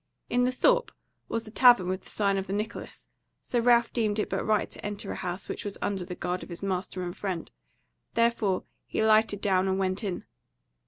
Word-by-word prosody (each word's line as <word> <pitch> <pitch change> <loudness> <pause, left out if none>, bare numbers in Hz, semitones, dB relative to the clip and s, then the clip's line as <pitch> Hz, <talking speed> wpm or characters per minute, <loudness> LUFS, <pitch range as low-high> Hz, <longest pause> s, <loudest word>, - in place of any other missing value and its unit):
In 245 0 +3
the 250 - +2
thorp - - +3 0.4
was 230 -1 -2
a - - -9
tavern 240 -6 +6
with 185 +1 -3
the - - -13
sign 200 -2 +1
of 190 - -5
the 195 - -3
Nicholas, 215 +3 -5 0.4
so 245 - 0
Ralph 235 0 +4
deemed 215 -3 +1
it 210 - -1
but - - 0
right 215 -1 +2
to - - -10
enter 205 -1 -4
a - - -4
house 180 +2 -4
which - - -5
was 205 -2 -5
under 195 -2 -1
the 180 0 -6
guard 180 +1 -2
of - - -9
his 170 +2 -8
master 185 -1 -2
and 175 0 -4
friend; 185 -5 -4 0.6
therefore 230 -5 +2 0.2
he - - 0
lighted 215 -2 +4
down 190 -2 +2
and 190 0 +1
went 190 +2 -1
in. 190 -4 -3
205 Hz, 215 wpm, -28 LUFS, 185-225 Hz, 0.6 s, tavern